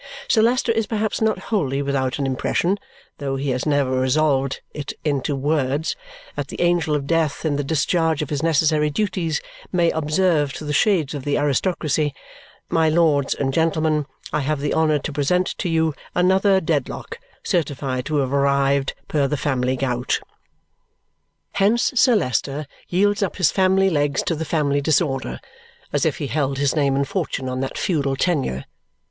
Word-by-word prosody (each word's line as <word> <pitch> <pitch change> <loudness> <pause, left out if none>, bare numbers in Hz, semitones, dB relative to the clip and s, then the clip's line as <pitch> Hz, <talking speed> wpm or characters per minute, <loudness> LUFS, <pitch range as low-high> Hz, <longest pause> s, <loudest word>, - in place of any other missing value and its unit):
Sir 220 - +4
Leicester 240 +1 +2
is 225 -2 0
perhaps 220 -1 -1
not 220 -2 +2 0.2
wholly 140 -8 0
without 135 -2 -1
an 140 - -1
impression, 170 +8 0 0.4
though 135 -1 -2
he 135 +1 -2
has 125 +4 -2
never 145 -3 +2
resolved 135 0 +1
it 145 -2 -5
into 145 -1 0
words, 145 +1 0 0.4
that - - -3
the - - -8
angel 175 -3 +2
of 140 -2 -2
death 160 0 0
in 150 -2 +1
the 145 - -1
discharge 160 +1 +1
of 150 - -8
his 145 -1 -1
necessary 155 -1 +2
duties 165 -2 -1 0.3
may 170 -2 +2
observe 155 -2 +1
to 155 - -7
the 150 - -2
shades 160 -3 +2
of 145 -3 -5
the 145 - 0
aristocracy, 145 0 0 0.5
"My 160 -1 +2
lords 155 -4 +2
and 135 -1 -1
gentlemen, 155 -2 +1 0.3
I 150 - +2
have 150 +1 -1
the 145 +1 -1
honour 155 -2 +3
to 145 +1 -5
present 180 +6 +1
to 180 - -1
you 160 -1 +1 0.2
another 190 +2 +4
Dedlock 165 - -3 0.2
certified 140 -7 -1
to 155 - -2
have 135 -2 0
arrived 140 0 +2
per 145 -3 +1
the 150 - -1
family 130 -3 0
gout." 125 -2 -1 1.3
Hence 205 +4 +2
Sir 250 -1 +4
Leicester 140 - -1 0.2
yields 205 +3 +2
up 200 - -1
his 185 -5 +3
family 190 0 +3
legs 145 -3 +1
to - - 0
the 160 0 -3
family 145 -3 +1
disorder 135 - 0 0.5
as - - +2
if - - -1
he - - -3
held 140 -1 -1
his 140 +1 +1
name 140 -3 +2
and 140 0 0
fortune 140 -7 -3
on 130 0 -3
that 135 0 -3
feudal 140 -6 0
tenure. 135 - -1
150 Hz, 170 wpm, -22 LUFS, 140-170 Hz, 1.3 s, Sir